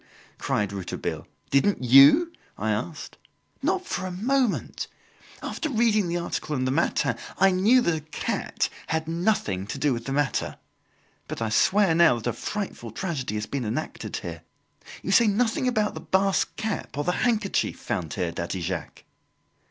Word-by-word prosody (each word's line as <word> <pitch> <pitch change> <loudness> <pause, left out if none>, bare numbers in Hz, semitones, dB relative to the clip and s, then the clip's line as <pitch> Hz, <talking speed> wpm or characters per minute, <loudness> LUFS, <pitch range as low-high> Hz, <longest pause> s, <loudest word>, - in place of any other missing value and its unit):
cried 105 -1 0
Rouletabille. 95 -3 -4 0.2
"Didn't 140 +3 +2
you?" 140 - +7 0.2
I - - -1
asked. - - -4 0.4
"Not 370 - 0
for 185 +1 -3
a - - -5
moment. 245 +6 0 0.6
After 315 - -3
reading 220 -6 +2
the 170 +1 -1
article 160 -3 -3
in 130 -1 0
the 130 - +1
'Matin,' 140 -4 +1 0.2
I 195 0 +5
knew 210 +8 +4
that 170 - +2
a - - -3
cat 155 +1 -2 0.2
had 160 0 -1
nothing 165 - 0
to 125 - -4
do 135 0 +2
with 115 -1 -5
the 135 - -4
matter. 145 0 0 0.7
But - - -5
I 115 -1 -1
swear 190 - +4
now 165 -5 +5
that 115 - -7
a 120 - 0
frightful 190 - -5
tragedy 135 - -3
has 105 0 -2
been 140 +2 -3
enacted 120 +8 -4
here. - - -6 0.6
You - - -2
say 235 - +6
nothing 230 +4 +1
about 215 -4 +1
the - - -7
Basque 195 0 +1
cap, 220 -9 -4
or 145 - 0
the 180 - +1
handkerchief, 220 -5 +1
found 80 -5 -3
here, 85 -2 -1
Daddy 85 +2 -4
Jacques?" 85 -2 -5
165 Hz, 165 wpm, -26 LUFS, -, 0.7 s, you